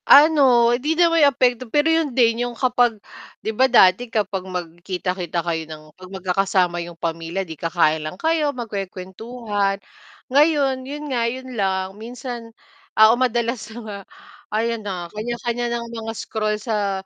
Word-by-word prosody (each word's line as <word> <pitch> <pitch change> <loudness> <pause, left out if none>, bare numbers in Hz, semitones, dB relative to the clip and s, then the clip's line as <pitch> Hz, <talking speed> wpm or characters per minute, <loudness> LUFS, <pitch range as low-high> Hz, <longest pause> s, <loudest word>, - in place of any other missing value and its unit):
Ano. 270 -6 +7
Hindi 295 +6 0
naman 335 -2 +4
yung 290 - +7
apekto, 250 -1 +1
pero 295 +5 +2
yun 325 -2 +2
din 230 -1 +3
yung 240 -1 -8
kapag 245 -2 +2 0.5
'di 220 - 0
ba, 260 +4 +3
dati 235 +1 +5
kapag 205 -3 -1
magkita-kita 175 0 -4
kayo 165 -1 -1
ng 155 -1 -9
'pag 185 +1 -13
magka-kasama 185 -1 0
yung 170 0 -8
pamilya 165 +3 -3
'di 165 - -7
ka-kain 160 -1 +1
lang 155 +4 -6
kayo, 320 +2 +1
magkuwe-kuwentuhan, 205 -2 -3 0.6
ngayon 285 -3 +3
yun 295 +1 -6
nga 240 - +1
yun 260 +1 -7
lang, 190 -3 -1
minsan 240 0 -7 0.5
oo 220 +1 +8
madalas 240 -2 -1
na 220 - -10
nga 205 -2 -6 0.6
ayon 230 0 -1
na, 185 -4 -4
kanya-kanya 240 +2 -3
ng 235 - -6 0.2
mga 225 0 -4
scroll 215 -1 -2
sa 200 -4 -2
220 Hz, 150 wpm, -22 LUFS, 185-250 Hz, 0.6 s, oo